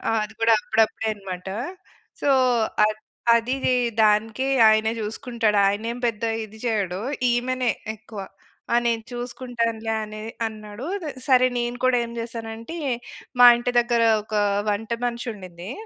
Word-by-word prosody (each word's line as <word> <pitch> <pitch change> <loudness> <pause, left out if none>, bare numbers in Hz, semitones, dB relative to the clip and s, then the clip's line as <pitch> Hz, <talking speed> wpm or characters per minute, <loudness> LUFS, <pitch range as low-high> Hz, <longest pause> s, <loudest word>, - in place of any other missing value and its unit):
ఆహ్, 225 -1 +2
అది 220 +1 -10
కూడా 230 0 +5
అప్పుడప్పుడే 220 0 +1
అనమాట. 190 -2 -7 0.7
సో, 285 - +2 0.6
అద్ 215 0 -3 0.3
అదీదీ 255 +2 +1 0.3
దానికి 220 +4 +2 0.2
ఆయనే 220 +1 +3
చూసుకుంటాడు. 220 0 -1
ఆయనేం 225 +4 -2
పెద్ద 230 -1 -2 0.2
ఇది 220 +1 -13
చేయడు, 200 -4 -1 0.3
ఈమెనే 250 0 0 0.2
ఎక్కువ 220 -1 -10 0.5
ఆహ్, 240 0 +4
నేను 230 -1 +1
చూసుకుంటానులే 235 -2 -3
అనే 215 0 -8 0.2
అన్నాడు. 215 +3 -8 0.2
దె 305 - -4 0.2
సరే 255 -1 +6
నేను 240 0 -2
కూడా 255 -1 +4
ఏం 235 - -8
చేశానంటే, 230 +5 -6 0.6
మా 245 - +11
ఇంటి 245 +1 -2
దెగ్గర 235 -1 +1 0.2
ఒక 215 - -7 0.4
వంట 220 +3 -2
మనిషుండింది 200 -6 -6
225 Hz, 130 wpm, -24 LUFS, 215-240 Hz, 0.7 s, మా